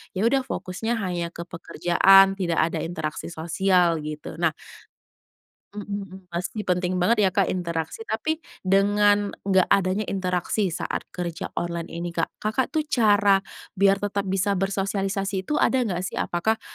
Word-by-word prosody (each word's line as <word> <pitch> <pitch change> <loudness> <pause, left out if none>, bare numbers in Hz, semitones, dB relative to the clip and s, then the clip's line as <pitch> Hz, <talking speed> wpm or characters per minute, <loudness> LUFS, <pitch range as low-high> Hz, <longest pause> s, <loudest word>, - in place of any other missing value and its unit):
ya 190 - 0
udah, 265 +3 +2
fokusnya 205 +6 -3
hanya 180 -6 -2
ke 170 0 -8
pekerjaan, 190 +3 +4
tidak 170 -3 0
ada - - -2
interaksi 160 -2 -4
sosial, 170 +1 +1
gitu. 150 +1 -7
Nah 160 -2 +1 1.2
mhm 205 0 -7 0.2
mhm, 190 0 -11
pasti 180 +5 -3
penting 180 -1 0
banget 230 +6 +3
ya, - - +4
Kak, 195 -2 +2
interaksi. 170 +3 -3
Tapi 315 +9 -1 0.2
dengan 205 +1 +3
nggak 190 -2 +3
adanya 195 +2 +1
interaksi 185 +1 -1
saat 165 - -3
kerja 170 -2 -5
online 170 -1 -3
ini, 170 0 -5
Kak, 165 -1 -1
Kakak 215 +5 -1
tuh 310 -2 -1
cara 205 -7 +4 0.3
biar 195 0 +4
tetap 205 0 -2
bisa 195 +1 +1
bersosialisasi 195 0 -1
itu 300 +10 -2
ada 260 - +3
nggak 185 -6 -2
sih? - - -5
Apakah 220 +6 -1
190 Hz, 150 wpm, -24 LUFS, 175-205 Hz, 1.2 s, pekerjaan